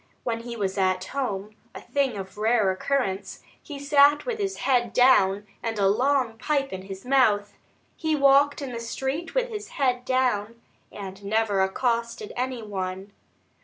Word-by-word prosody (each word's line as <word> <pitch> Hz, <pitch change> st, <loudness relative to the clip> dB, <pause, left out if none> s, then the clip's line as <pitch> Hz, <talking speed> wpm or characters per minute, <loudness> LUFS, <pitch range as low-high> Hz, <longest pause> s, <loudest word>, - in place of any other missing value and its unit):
When 230 Hz, -2 st, -2 dB
he 235 Hz, 0 st, -7 dB
was 195 Hz, -1 st, -2 dB
at 185 Hz, -1 st, +1 dB
home 215 Hz, -5 st, -4 dB, 0.2 s
a -, -, -6 dB
thing 275 Hz, -6 st, -1 dB
of 190 Hz, -1 st, -7 dB
rare 215 Hz, -3 st, +3 dB
occurrence 195 Hz, -3 st, -2 dB, 0.2 s
he 290 Hz, -, -8 dB
sat 285 Hz, +1 st, +4 dB
with 470 Hz, -3 st, -3 dB
his 390 Hz, -1 st, -2 dB
head 245 Hz, -4 st, +2 dB
down 205 Hz, -6 st, +4 dB, 0.2 s
and 225 Hz, -1 st, -3 dB
a 200 Hz, -1 st, +3 dB
long 245 Hz, +1 st, +1 dB
pipe 275 Hz, -3 st, -1 dB
in 190 Hz, -, -5 dB
his 195 Hz, +1 st, -9 dB
mouth; 220 Hz, -6 st, +3 dB, 0.4 s
he 315 Hz, -1 st, 0 dB
walked 280 Hz, +1 st, +4 dB
in 265 Hz, -, -5 dB
the 235 Hz, -, -5 dB
street 265 Hz, +7 st, -4 dB
with -, -, +1 dB
his 420 Hz, -2 st, -6 dB
head 250 Hz, -3 st, +1 dB
down, 235 Hz, -4 st, 0 dB, 0.3 s
and 195 Hz, 0 st, -8 dB
never 205 Hz, -1 st, +1 dB
accosted 230 Hz, +2 st, -1 dB
any 250 Hz, -1 st, -3 dB
one. 190 Hz, -1 st, -5 dB
235 Hz, 165 wpm, -25 LUFS, 200-275 Hz, 0.4 s, sat